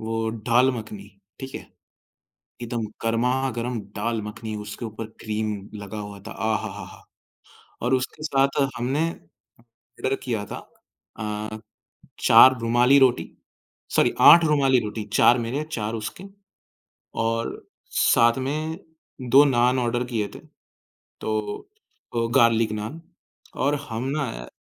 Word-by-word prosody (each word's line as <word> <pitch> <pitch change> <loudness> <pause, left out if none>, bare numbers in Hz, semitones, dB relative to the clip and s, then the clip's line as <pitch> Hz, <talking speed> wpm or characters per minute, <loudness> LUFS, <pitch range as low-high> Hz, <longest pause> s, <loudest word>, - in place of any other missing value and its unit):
वो 115 0 -2
ढ़ाल 120 +3 +2
मखनी, 105 -4 -8 0.3
ठीक 130 0 -7
है। - - -8 0.9
एकदम 120 -1 -3 0.2
गरमा-गरम 120 0 0 0.2
दाल 115 -1 -1
मखनी 110 +1 -6
उसके 105 +3 -7
ऊपर 110 0 -6 0.2
क्रीम 110 -1 -2 0.2
लगा 100 +1 -7
हुआ 105 -1 -7
था, - - -7
आ 110 +2 -1
हा, - - -4
हा, - - -8
हा! - - -14 0.8
और 125 +2 0
उसके 130 +4 -4
साथ 140 -2 +1 0.2
हमने 135 +7 0 0.7
ऑर्डर 135 - -3
किया 115 -5 -2
था - - -7 0.6
अ, 110 0 -4 0.7
4 130 0 +8
रूमाली 120 +4 +4
रोटी 130 -2 +3 0.7
सॉरी - - +3
8 170 - +9
रुमाली 140 -4 +3
रोटी, 105 0 -4
4 120 - +5
मेरे, 125 +6 -2
4 110 -5 -3
उसके 110 - -6 1.0
और 115 +1 -2 0.4
साथ 120 +2 +4
में 155 +3 -3 0.5
2 140 +4 +8
नान 125 -2 +3
ऑर्डर 120 0 0
किए 115 -4 -2
थे। - - -8 0.8
तो 110 - -2 0.8
वो 115 0 +1
गार्लिक 115 -3 +4
नान 110 +10 -5 0.6
और 145 +2 +2
हम 115 +2 -4
ना 115 - -4
115 Hz, 130 wpm, -24 LUFS, 110-130 Hz, 1.0 s, 8